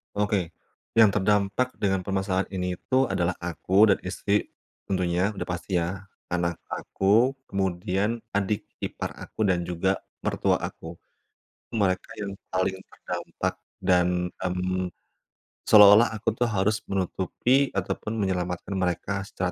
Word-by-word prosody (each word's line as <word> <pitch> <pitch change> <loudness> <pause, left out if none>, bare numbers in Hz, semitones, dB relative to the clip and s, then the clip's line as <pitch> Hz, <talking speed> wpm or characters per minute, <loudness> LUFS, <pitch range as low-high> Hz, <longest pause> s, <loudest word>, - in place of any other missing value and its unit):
Oke, 100 -4 0 0.5
yang 110 - +9
terdampak 105 +4 +2
dengan 95 -2 +1
permasalahan 95 0 -1
ini 90 -1 -2
itu 130 +7 +1
adalah 90 -3 0
aku 95 +4 +3
dan 100 - +4
istri, 100 +2 -1 0.3
tentunya, 90 +1 0
udah 100 - -5
pasti 90 +1 -1
ya, 90 +3 -3 0.2
anak 85 -1 -1
aku, 110 +7 +2 0.2
kemudian 95 +3 -1 0.2
adik 100 +1 0 0.2
ipar - - -4
aku 110 - -2
dan 90 -2 +2
juga, 90 +2 0 0.2
mertua - - +1
aku. 80 +1 -10 0.7
Mereka 95 -4 0
yang 100 -1 -3 0.2
paling 95 +1 +1
terdampak, 95 - -5 0.3
dan, 90 0 +2
mmm, 90 0 -2 0.7
seolah-olah 105 +2 +9
aku 110 +1 0
tuh 120 - +3
harus 105 0 +1
menutupi 100 +8 +1
ataupun 100 +3 -2
menyelamatkan 90 -3 -2
mereka 90 +3 -1
secara 90 -2 -2
95 Hz, 125 wpm, -26 LUFS, 90-105 Hz, 0.7 s, yang